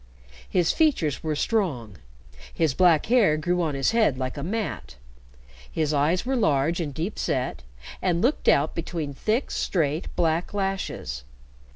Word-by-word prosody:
His 175 -2 +2
features 265 - +1
were 155 -1 -2
strong, 145 - -1 0.5
his 160 -5 +1
black 170 -1 +4
hair 220 -10 +4
grew 175 +3 0
on 155 -4 -1
his 135 -1 +1
head 220 - +2
like 130 -1 -3
a 145 - -5
mat, 200 - -4 0.8
his 155 -1 0
eyes 155 +8 +1
were 265 +1 0
large 160 - +2
and 155 -4 -2
deep 165 +9 -4
set, 130 - -1 0.4
and 175 -2 +1
looked 255 - 0
out 145 +3 +4
between 160 -3 -4
thick, 220 - -1
straight, 155 -2 -1
black 165 +3 0
lashes. 190 - -3
165 Hz, 150 wpm, -25 LUFS, 145-195 Hz, 0.8 s, black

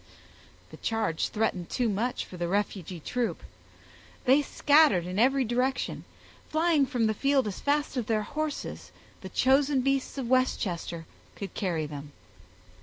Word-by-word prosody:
The - - -10
charge 225 -8 -1
threatened 210 -5 -1
too 245 -2 0
much 225 +4 -1
for - - -11
the 175 -1 -2
refugee 190 -2 -2
troop. 230 +2 -2 0.8
They 270 +4 +6
scattered 285 - +4
in 185 +2 -3
every 265 +2 +4
direction, 250 +3 -1 0.4
flying 315 -3 +3
from 245 -5 0
the 220 - +2
field 275 +3 +2
as 200 - -5
fast 290 0 0
as 240 - -1
their 215 -2 +1
horses, 305 +5 -4 0.3
the - - -7
chosen 270 +1 +3
beasts 275 +1 0
of 260 -3 -3
Westchester, 185 -10 0 0.3
could 200 - -7
carry 170 -6 -1
them. 145 -1 -8
240 Hz, 145 wpm, -28 LUFS, 190-275 Hz, 0.8 s, They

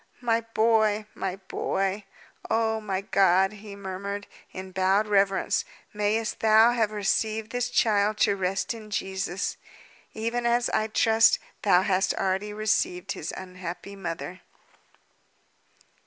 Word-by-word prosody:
"My 230 -2 +1
boy! 220 -1 +3
my 190 -1 -3
boy! 195 +1 -2 0.4
Oh, 220 -1 +1
my 195 -3 -2
God!" 190 -1 +3
he 210 -1 -10
murmured, 200 +1 -5 0.3
in 185 0 -8
bowed 190 +3 +2
reverence, 195 -2 +2 0.3
"mayest 210 +2 -1
Thou 220 +1 +6
have 230 -3 +1
received 215 +1 -1
this 245 0 -1
child 215 -3 +2
to 200 - +4
rest 190 +3 -1
in 220 -2 -10
Jesus, 190 -2 -3 0.6
even 235 +2 -1
as, 240 0 +2
I 215 - +1
trust, 225 +1 +4 0.2
Thou 185 -3 +4
hadst 190 0 +1
already 195 +2 -1
received 200 -3 0
his 160 - -4
unhappy 185 +1 -7
mother!" 180 -1 -6
205 Hz, 125 wpm, -26 LUFS, 190-220 Hz, 0.6 s, Thou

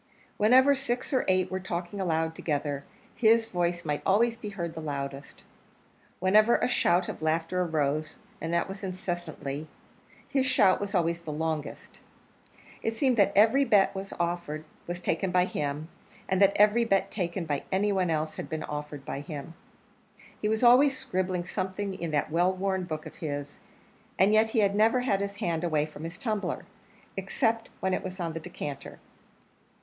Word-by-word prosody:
Whenever 260 +6 +6
six 265 0 -3
or 260 - +3
eight 185 -1 +2
were 185 - -1
talking 180 +1 -4
aloud 160 -2 0
together, 145 -3 -2 0.3
his 225 0 +4
voice 175 -4 -1
might 150 -1 -1
always 230 +4 +3
be 230 -3 -7
heard 170 -5 -4
the 160 - -6
loudest. 140 -2 -5 0.7
Whenever 215 +5 +5
a - - +1
shout 180 -7 +2
of - - -6
laughter 165 +3 0
arose 155 -2 -1 0.2
and 165 - -3
that 170 0 +1
was 195 +1 -7
incessantly 175 -5 -4 0.6
his 270 -2 +1
shout 195 -7 +4
was 205 0 -3
always 170 -1 +1
the 160 -2 -6
longest. 155 0 -4 0.8
It 225 0 -2
seemed 260 0 +3
that 200 -1 +4
every 225 +7 +5
bet 205 -7 +4
that - - -17
was 195 0 -5
offered 170 -3 -2 0.2
was 175 0 -3
taken 180 +1 -1
by 180 0 +3
him, 150 -2 -3 0.4
and 190 0 +1
that 200 0 +6
every 210 +3 +5
bet 195 -4 +1
taken 175 -2 -2
by 145 -3 -1
any 200 +2 +2
one 185 -3 +1
else 155 -1 -1
had - - -6
been 155 -1 -3
offered 150 -1 -6
by - - -4
him. 145 +2 -7 0.9
He 210 - +1
was 220 +2 0
always 260 +3 +6
scribbling 185 -4 -2
something 190 +1 -3
in 170 -3 -4
that 150 0 0
well 175 +3 +3
worn 190 0 -1
book 155 -2 -5
of - - -10
his, 145 -2 -5 0.6
and 195 +3 +4
yet 220 +1 +4
he 220 -3 +3
never 220 +5 +3
had 200 -6 +1
his 200 0 -3
hand 170 -6 -2
away 155 -3 +1
from 155 0 -9
his 165 +2 -6
tumbler 215 -4 -2 0.5
except 225 +4 -1
when 190 0 +1
it - - -1
was 185 0 -6
on 165 -2 -2
the 165 - -4
decanter. 145 -3 -7
185 Hz, 175 wpm, -28 LUFS, 160-205 Hz, 0.9 s, Whenever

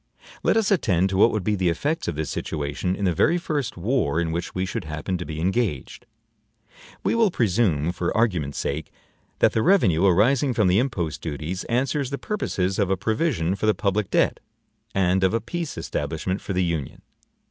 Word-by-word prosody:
Let - - +2
us 220 -2 +2
attend 95 - +2
to 95 - 0
what 110 - +6
would 110 -4 -2
be 105 - +1
the 95 -3 +1
effects 145 - -1
of 85 - -2
this 75 -1 -3
situation 75 +4 -2
in 100 - -2
the 90 - +2
very 170 - +3
first 150 - -3
war 90 - 0
in 85 -1 -1
which 85 +2 -4
we 95 0 0
should 90 - -4
happen 75 +4 -3
to 90 - -4
be 80 -1 -5
engaged. 95 - -2 1.0
We - - +1
will 230 -2 +4
presume, 95 - +1
for 90 -1 -2
argument's 90 -11 0
sake, 75 +3 -3 0.5
that - - +3
the 110 - +2
revenue 100 - +3
arising 120 +8 +3
from 105 -4 +3
the 90 +3 +4
impost 95 - -2
duties 80 +3 -4
answers 130 +3 0
the 140 - -3
purposes 100 - -2
of 100 -2 +2
a 95 - +1
provision 110 - 0
for 110 - -2
the 110 - +4
public 100 -1 0
debt - - +2 0.6
and 95 0 +2
of 95 +3 +3
a - - +2
peace 170 +8 -5
establishment 80 +6 -3
for 100 - -4
the 90 0 +1
Union. 80 -6 -3
95 Hz, 195 wpm, -24 LUFS, 85-120 Hz, 1.0 s, what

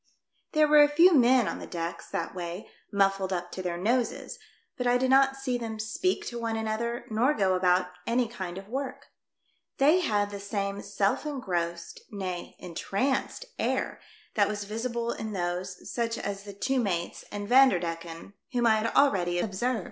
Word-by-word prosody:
There 305 0 +5
were 300 0 +7
a 290 - +6
few 340 +5 +6
men 255 -4 +5
on - - -3
the - - -8
decks 170 0 -5
that - - -3
way, 175 +1 -6 0.2
muffled 195 -1 +2
up 175 -1 -3
to 185 - -5
their 175 -2 -3
noses; 230 +5 -1 0.4
but 250 - -2
I 245 0 +4
did 260 +1 +1
not 270 0 +5
see 260 -2 -2
them 225 -2 -5
speak 225 +13 -1
to 240 - -5
one 230 -1 -2
another 225 +2 -2
nor 245 +7 +2
go 190 -3 +2
about 180 0 +2 0.2
any 240 +1 +2
kind 190 -6 -6
of 195 0 -8
work. 270 +4 -5 0.7
They 300 +6 +5
had 205 - 0
the 200 - -6
same 200 0 -3
self 195 0 0
engrossed, 175 - -3
nay, 185 -5 -5
entranced 205 - -2
air - - -1 0.3
that 205 -2 +3
was 205 -1 -3
visible 230 +3 -3
in 220 -2 -5
those, 180 0 -3
such 230 -1 -1
as 200 0 -4
the 200 - -8
two 230 +7 0
mates 175 -7 -2
and 205 0 -5
Vander 255 -5 +6
decken, 165 +1 -6 0.2
whom 240 -1 +2
I 220 -1 +5
had 215 +1 0
already 180 -11 +3
observed. 220 +6 0
215 Hz, 180 wpm, -28 LUFS, 185-250 Hz, 0.7 s, were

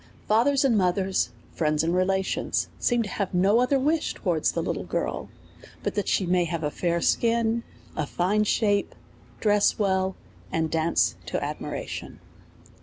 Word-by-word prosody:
Fathers 265 +6 +3
and 250 -4 +3
mothers, 190 0 +1 0.2
friends 155 -1 +1
and 165 +1 +1
relations, 190 +1 0
seem 240 -2 +2
to 205 - -6
have 190 -1 -3
no 195 +5 +4
other 250 +3 +3
wish 305 +4 0
towards - - 0
the - - -1
little - - -2
girl, - - -3 0.5
but - - -1
that 205 - -2
she 190 - +2
may 180 0 +2
have 165 -1 -3
a 150 - -1
fair 170 +1 -1
skin, 230 +2 +2 0.3
a 155 -2 -2
fine 200 +7 +1
shape, 205 -1 +1 0.4
dress 205 -1 +3
well, 190 -2 +1 0.4
and 160 -1 0
dance 165 +1 +1
to - - -2
ad - - -4
miration. - - -6
195 Hz, 160 wpm, -26 LUFS, 175-225 Hz, 0.5 s, no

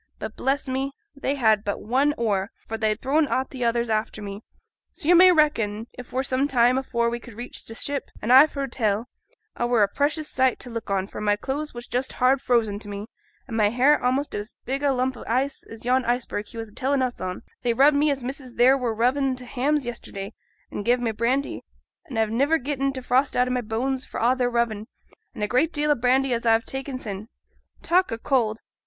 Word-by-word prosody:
But, - - -6
bless 275 +1 -1
ye, 265 +1 -2 0.2
they 280 0 -1
had 220 -6 +3
but 205 - -3
one 270 +7 +1
oar; 205 -3 0 0.2
for 225 - -4
they'd 220 -1 0
thrown 290 +4 +2
a' 260 - 0
t' 260 -3 -6
others 235 0 +1
after 215 0 -1
me; 200 0 -7 0.5
so 325 - -7
yo' - - +8
may 365 +1 +8
reckon, 230 -10 +2
it 250 0 -11
were 260 +1 0
some 265 +1 +1
time 250 -1 +3
afore 235 -3 -1
we 235 +1 -2
could 235 -2 -13
reach 240 +2 -7
t' 225 - -5
ship; 280 +3 -3
an' 235 - -1
a've 280 +5 +7
heerd 275 -2 -3
tell, 215 -2 0 0.5
a 240 - -1
were 240 -3 +4
a - - +4
precious 295 +7 -1
sight 260 -1 +2
to 245 - -6
look 230 -2 -5
on, 195 -1 0
for 200 - -8
my 205 -1 +2
clothes 280 +6 -4
was 240 0 -7
just 250 +2 -2
hard 260 +1 +3
frozen 225 -6 +1
to 210 - -10
me, 205 0 -5 0.4
an' 230 - -5
my 210 -2 +3
hair 260 +6 +4
a'most 260 +3 0
as 210 +2 -5
big 270 +2 -2
a 285 -1 +3
lump 255 0 0
o' - - -9
ice 265 +4 0
as 225 +1 -10
yon 255 +1 +3
iceberg 235 -4 -1
he 230 - -11
was 225 -1 -5
a - - -19
telling 265 +2 0
us 250 -1 -3
on; 185 0 -4 0.2
they 240 - +1
rubbed 285 +4 +5
me 295 +1 +3
as 275 -3 -1
missus 260 0 -6
theere 250 +3 +5
were 235 -3 -1
rubbing 260 +3 +1
t' 250 0 -9
hams 275 +3 0
yesterday, 210 -3 -6 0.4
and 205 - -4
gav' 245 +3 +3
me 235 -2 0
brandy; 250 +6 -1 0.5
an' 250 - -5
a've 220 -1 +1
niver 280 +8 +3
getten 275 -1 -1
t' 260 -1 -6
frost 255 +2 +1
out 250 0 +3
o' - - -2
my 250 0 0
bones 250 +4 -2
for - - -6
a' 245 +3 +3
their 250 -1 +1
rubbin', 235 -3 -1 0.5
and 215 - -4
a 250 +9 +2
deal 300 -2 0
o' - - +4
brandy 255 +2 +2
as 235 - -1
I 225 -1 +5
'ave 225 - 0
ta'en 270 0 -4
sin'. 210 -3 -6 0.6
Talk 360 +2 +2
o' 225 - -2
cold! 230 -3 0
250 Hz, 235 wpm, -24 LUFS, 225-270 Hz, 0.6 s, yo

